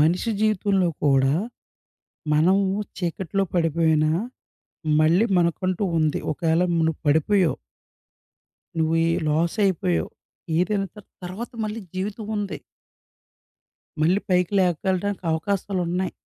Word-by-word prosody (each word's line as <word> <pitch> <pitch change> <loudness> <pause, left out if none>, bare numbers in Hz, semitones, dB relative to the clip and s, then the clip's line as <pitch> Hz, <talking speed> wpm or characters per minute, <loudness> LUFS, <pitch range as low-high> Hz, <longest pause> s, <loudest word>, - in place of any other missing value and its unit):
మనిషి 175 +9 +2
జీవితంలో 200 -3 +2 0.2
కూడా, 135 -1 +4 1.0
మనం 170 +6 +4 0.4
చీకట్లో 190 +2 -1
పడిపోయినా, 160 -2 +2 0.9
మళ్ళీ 170 +8 +4
మనకంటూ 180 +3 0 0.2
ఉంది. 155 -2 +1
ఒకేల 165 +2 +1 0.2
నువ్వు 160 -1 +1
పడిపోయావు? 160 +4 +3 1.2
నువ్వు 160 0 +1
ఈ - - +2 0.2
లాస్ 160 +6 +1
అయిపోయావు. 90 - 0 0.5
ఏదైనా 195 +2 +1
త - - -11 0.3
తర్వాత 195 +7 -6
మళ్ళీ 215 +1 -4
జీవితం 200 +3 -4
ఉంది. 205 -2 -3 1.4
మళ్ళీ 175 +6 +3
పైకి 180 0 +2
లేపకెల్లటానికి 185 +2 0
అవకాశాలున్నాయి. 180 0 -1
180 Hz, 95 wpm, -24 LUFS, 160-195 Hz, 1.4 s, కూడా